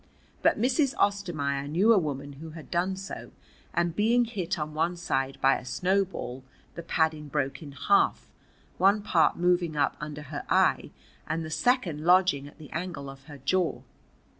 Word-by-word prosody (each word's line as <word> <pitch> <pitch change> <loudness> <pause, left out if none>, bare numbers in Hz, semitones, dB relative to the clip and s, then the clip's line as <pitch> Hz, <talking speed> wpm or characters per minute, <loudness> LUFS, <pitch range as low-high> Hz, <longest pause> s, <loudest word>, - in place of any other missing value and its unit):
But - - +3
Mrs. 265 +3 +2
Ostermaier 155 -9 0
knew 190 +10 +4
a - - +4
woman 145 -3 -4
who 160 - -7
had 160 - -11
done 180 +2 0
so, 195 +1 -7 0.4
and 170 -1 0
being 235 +4 +3
hit 195 -5 -3
on 150 -1 -4
one 165 +3 0
side 135 -5 -1
by 135 0 +4
a - - -12
snowball, 180 -4 -1 0.3
the 170 - -6
padding 160 -2 0
broke 140 -1 -2
in 145 -3 -9
half, 395 - +2 0.5
one 200 +2 +4
part 185 -6 +3
moving 175 -2 +1
up 145 -1 +1
under 150 0 -6
her 145 0 -6
eye - - +3 0.4
and 160 +1 -2
the 155 - -7
second 180 - +1
lodging 180 -5 +4
at 145 - -15
the 150 -2 -12
angle 160 -5 -5
of 135 0 -15
her 145 -1 -10
jaw. 170 +6 0
165 Hz, 170 wpm, -28 LUFS, 145-190 Hz, 0.5 s, knew